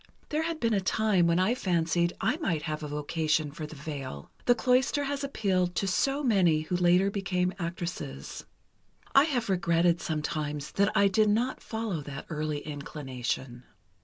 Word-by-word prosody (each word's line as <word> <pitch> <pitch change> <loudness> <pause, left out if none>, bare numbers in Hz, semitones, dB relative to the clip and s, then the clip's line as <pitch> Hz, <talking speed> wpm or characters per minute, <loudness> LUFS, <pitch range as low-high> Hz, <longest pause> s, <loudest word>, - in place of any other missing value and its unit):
There 305 +1 0
had 325 0 -2
been 230 -4 +1
a 200 - +2
time 195 -3 +2
when 170 0 +3
I 185 +6 +3
fancied 170 -5 +1
I - - +1
might 170 - -1
have 155 -1 -3
a 150 - -4
vocation 150 +1 0
for 155 +1 -6
the 155 - -10
veil. 140 - -7
The 245 - +5
cloister 255 +4 +2
has 285 0 -2
appealed 185 -9 0
to - - 0
so 275 +9 +1
many 185 - +3
who 155 +3 -2
later 180 +2 +4
became 185 -2 0
actresses. 170 - -5 0.7
I 275 +2 +7
have 260 -7 -1
regretted, 175 -2 +2
sometimes, 150 -2 -3
that 200 +1 +2
I 200 - +6
did 210 +2 +3
not 235 +5 0
follow 220 -8 -3
that 140 -1 -7
early 150 -1 -2
inclination. 130 -4 -4
175 Hz, 165 wpm, -29 LUFS, 155-215 Hz, 0.7 s, I